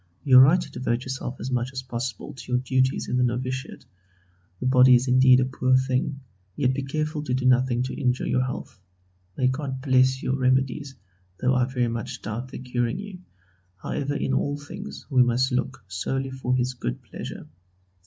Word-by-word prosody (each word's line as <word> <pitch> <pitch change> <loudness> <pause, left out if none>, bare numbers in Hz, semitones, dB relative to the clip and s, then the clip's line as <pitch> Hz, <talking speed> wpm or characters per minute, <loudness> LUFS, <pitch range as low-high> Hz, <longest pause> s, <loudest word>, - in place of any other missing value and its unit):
You 130 -3 +7
are - - +11
right 155 +8 +6
to - - -7
devote 120 -1 -2
yourself 130 -1 -5
as 130 - -5
much 125 0 0
as 130 -1 -4
possible 120 -3 -5
to 130 - -10
your - - +4
duties 130 0 +1
in 125 - 0
the 125 - +3
novitiate. 130 +3 -3 0.7
The - - -4
body 130 0 +6
is 125 +2 +1
indeed 130 0 +6
a 130 - +2
poor 130 0 +1
thing, 130 +2 0 0.3
yet 130 -2 +1
be 140 - -2
careful 155 +2 -2
to 125 -4 -1
do 130 0 -2
nothing 125 -1 +3
to 130 - -4
injure 125 0 0
your 125 - +1
health. 130 -5 -6 0.6
May 130 - +1
God 130 0 -1
bless 130 -1 +2
your 130 - 0
remedies, 130 +1 0 0.4
though 130 +1 +2
I 125 -1 +3
very 125 -2 -1
much 115 -1 -5
doubt 115 +4 -4
their 130 - -9
curing 125 +2 -1
you: 195 -2 -8 0.6
however, 145 +9 -3
in 135 - -1
all 145 +2 0
things 70 - -9
we 130 -2 +5
must 125 +2 +2
look 125 0 -2
solely 135 +8 -3
for 130 -1 -1
His 125 0 0
good 60 - -5
pleasure. - - -8
130 Hz, 195 wpm, -25 LUFS, 125-130 Hz, 0.7 s, are